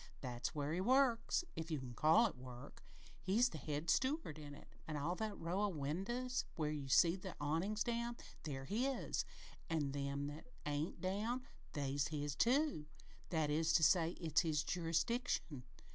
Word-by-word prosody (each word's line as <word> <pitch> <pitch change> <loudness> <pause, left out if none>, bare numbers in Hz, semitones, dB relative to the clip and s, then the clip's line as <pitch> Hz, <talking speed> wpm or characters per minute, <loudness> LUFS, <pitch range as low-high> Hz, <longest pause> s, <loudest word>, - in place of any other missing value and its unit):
That's 125 +3 -3
where 145 +1 -1
he 180 - 0
works 250 - +3
if 160 +1 -4
you 155 -3 -1
can 125 -2 -7
call 160 - +5
it - - -1
work. 125 +1 -10 0.4
He's 220 +7 +3
the 160 - -7
head 150 +2 -3
steward 260 - +1
in 145 -1 -8
it. - - -14 0.2
All 155 +3 -1
that 215 +2 -3
row 175 +4 -1
o' 210 - +3
winders 195 - -1
where 155 -2 0
you 145 -3 -4
see 165 +6 +6
the 190 -1 -7
awnin's 165 +9 0
down, 235 0 -1 0.2
they're 135 -4 -4
his 250 - 0 0.4
an' 150 -4 0
them 140 0 -2
that 145 - -7 0.2
ain't 150 +3 -2
down, 215 +7 -1 0.3
they're 140 -2 -1
his, 145 -2 -2
too 250 - +2 0.4
that 155 -3 +1
is 160 +2 +2
to 165 - +5
say, 165 +1 +5
it's 160 -3 +2
his 155 -4 +1
jurisdiction. 165 - 0
165 Hz, 165 wpm, -39 LUFS, 145-215 Hz, 0.4 s, see